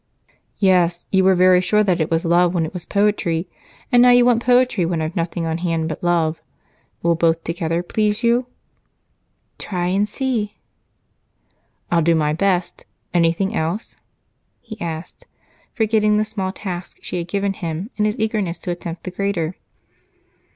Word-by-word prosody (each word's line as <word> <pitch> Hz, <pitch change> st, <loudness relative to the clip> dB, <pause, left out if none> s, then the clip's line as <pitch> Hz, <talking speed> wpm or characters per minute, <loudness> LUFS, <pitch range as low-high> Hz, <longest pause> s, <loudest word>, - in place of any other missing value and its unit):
"Yes, 180 Hz, -3 st, +2 dB
you 190 Hz, -1 st, +3 dB
were 190 Hz, 0 st, +5 dB
very 180 Hz, 0 st, +5 dB
sure 210 Hz, +3 st, +2 dB
that 185 Hz, -4 st, +1 dB
it 155 Hz, -, 0 dB
was 165 Hz, 0 st, 0 dB
love 175 Hz, +1 st, +3 dB
when 165 Hz, -2 st, +1 dB
it 160 Hz, -, -7 dB
was 180 Hz, -2 st, -7 dB
poetry, 200 Hz, -5 st, 0 dB, 0.4 s
and 245 Hz, -1 st, +6 dB
now 250 Hz, -, +7 dB
you 245 Hz, 0 st, +6 dB
want 240 Hz, -2 st, +3 dB
poetry 250 Hz, -5 st, +3 dB
when 170 Hz, 0 st, -1 dB
I've 160 Hz, +3 st, -3 dB
nothing 170 Hz, -1 st, -2 dB
on 160 Hz, +1 st, -2 dB
hand 165 Hz, -2 st, -1 dB
but 155 Hz, +1 st, -6 dB
love. 165 Hz, -2 st, +1 dB, 0.6 s
Will 170 Hz, 0 st, +3 dB
both 165 Hz, 0 st, +1 dB
together 165 Hz, 0 st, -2 dB
please 210 Hz, +4 st, -1 dB
you?" 240 Hz, +2 st, +2 dB, 1.1 s
"Try 180 Hz, -3 st, -2 dB
and 200 Hz, +3 st, +1 dB
see." 230 Hz, -5 st, -2 dB, 1.4 s
"I'll 170 Hz, -1 st, +3 dB
do 165 Hz, +1 st, +3 dB
my 150 Hz, -1 st, +1 dB
best. 180 Hz, +1 st, -1 dB, 0.3 s
Anything 175 Hz, +5 st, +1 dB
else?" 170 Hz, +6 st, -3 dB, 0.6 s
he 220 Hz, -2 st, -11 dB
asked, 165 Hz, 0 st, -6 dB, 0.4 s
forgetting 215 Hz, -2 st, +2 dB
the 215 Hz, -, +1 dB
small 200 Hz, -3 st, -3 dB
task 180 Hz, -2 st, -6 dB
she -, -, -4 dB
had 170 Hz, -, -5 dB
given 200 Hz, +1 st, -1 dB
him 175 Hz, -, -5 dB
in 210 Hz, -, +1 dB
his 210 Hz, 0 st, -1 dB
eagerness 215 Hz, -5 st, -1 dB
to 180 Hz, -, -5 dB
attempt 175 Hz, -1 st, -6 dB
the 185 Hz, -, -5 dB
greater. 180 Hz, -3 st, -2 dB
180 Hz, 165 wpm, -20 LUFS, 170-210 Hz, 1.4 s, now